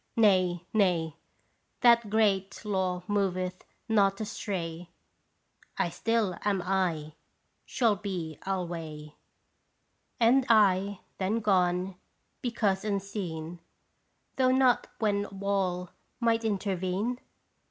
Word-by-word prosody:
Nay, 185 -5 +3
nay, 175 -7 +2 0.7
That 235 -3 +5
great 205 -1 +1
law 185 -3 -1
moveth 185 -3 -1 0.2
not 200 -3 +3
astray, 175 -5 -4 0.9
I 175 - +1
still 215 0 0
am 200 -3 0 0.5
/, - - -45
shall 225 -5 +2
be 180 -6 -5
alway! 165 -5 -4 1.1
And 250 +3 +4
I 200 -3 +4 0.2
then 200 +4 0
gone 185 -2 +1 0.4
because 210 -6 0
unseen, 190 -5 -4 0.8
Though 260 -1 +4
not 260 -1 +3
when 205 -2 +1
wall 190 -2 -2 0.3
might 230 -1 +2
intervene 200 +2 -1
195 Hz, 90 wpm, -29 LUFS, 180-215 Hz, 1.1 s, That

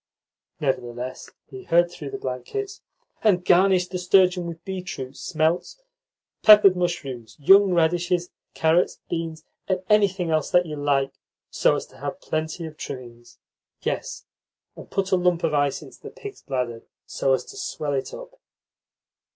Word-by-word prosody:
Nevertheless 125 -2 -3 0.2
he 130 -3 -10
heard 175 +1 +3
through 150 -5 -7
the - - -5
blankets: 390 - -5 0.4
"And 185 -5 +3
garnish 185 0 +4
the 180 0 -4
sturgeon 180 -1 +3
with 170 0 -8
beetroot, 180 -9 -6
smelts, 165 - -1 0.6
peppered 210 -3 +8
mushrooms, 140 -11 -4
young 195 +6 +6
radishes, 175 +1 +1 0.2
carrots, 160 +2 +2
beans, 165 -2 -4 0.2
and 185 -1 -1
anything 195 -5 +3
else 155 +1 0
you 175 -4 +3
like, 140 -2 0 0.4
so - - +3
as - - -4
to - - -19
have - - -5
plenty 160 +2 -3
of 155 -1 -9
trimmings. 120 -5 -9 0.5
Yes, - - -3 0.5
and - - -12
put 195 -1 -1
a - - +5
lump 180 -1 +1
of 160 -2 +1
ice 145 -2 +1
into - - -15
the - - -8
pig's 410 0 -10
bladder, 125 -4 -3 0.2
so 135 - 0
as 130 - 0
to 410 - -12
swell 155 - -4
it 135 -1 -2
up." - - -11
170 Hz, 150 wpm, -24 LUFS, 140-185 Hz, 0.6 s, peppered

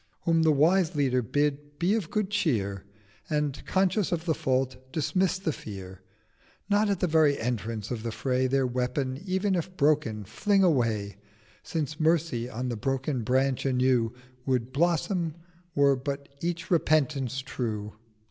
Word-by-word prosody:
Whom 165 -1 +3
the 160 -1 +5
wise 165 +4 +3
Leader 130 -3 +2
bid 145 +4 -1
be 180 +5 +2
of 210 -7 -1
good 210 -2 -1
cheer, 105 - 0 0.4
And, 150 -3 -1
conscious 190 +1 +1
of 170 -1 -1
the 165 - +2
Fault, 130 -1 -1
dismiss 185 +5 +1
the 180 -5 -2
Fear, 95 -5 -9 0.7
Nor 205 +1 +3
at 200 -3 0
the - - +4
very 155 -4 +4
Entrance 115 -2 -3
of 120 -3 -3
the 115 0 -3
Fray 125 +3 0
Their 135 0 +2
Weapon, 130 +3 -2
ev'n 190 +2 +1
if 185 +1 -3
broken, 140 -8 +2
fling 195 - +1
away: 115 - +1 0.4
Since 155 -2 -3
Mercy 155 -7 +1
on 125 +2 -3
the 120 - -2
broken 135 +2 -1
Branch 130 +3 +1
anew 125 -3 +2 0.4
Would 130 -1 0
blossom 170 +1 +1 0.4
were 140 -1 +5
but 140 +2 -5
each 175 +2 -3
Repentance 145 -6 +2
true. 105 -6 -4
140 Hz, 150 wpm, -28 LUFS, 125-165 Hz, 0.7 s, the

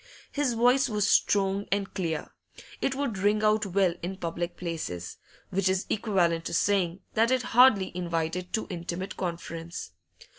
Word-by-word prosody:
His 285 -5 0
voice 245 +3 +4
was 210 -2 +1
strong 200 0 +2
and 200 0 -1
clear; 165 -5 -3 0.5
it 270 - 0
would 265 -8 -2
ring 210 +2 +2
out 215 -1 +3
well 190 -2 +2
in 190 +2 -4
public 170 0 -4
places, 155 - -5 0.3
which 190 0 +1
is 190 0 0
equivalent 180 -6 +1
to - - -2
saying 185 -2 +1
that 225 +1 +3
it 255 -1 +2
hardly 235 -7 +5
invited 170 0 -2
too 220 - -1
intimate 175 +2 -4
conference. 170 -1 -5
190 Hz, 150 wpm, -28 LUFS, 170-215 Hz, 0.5 s, hardly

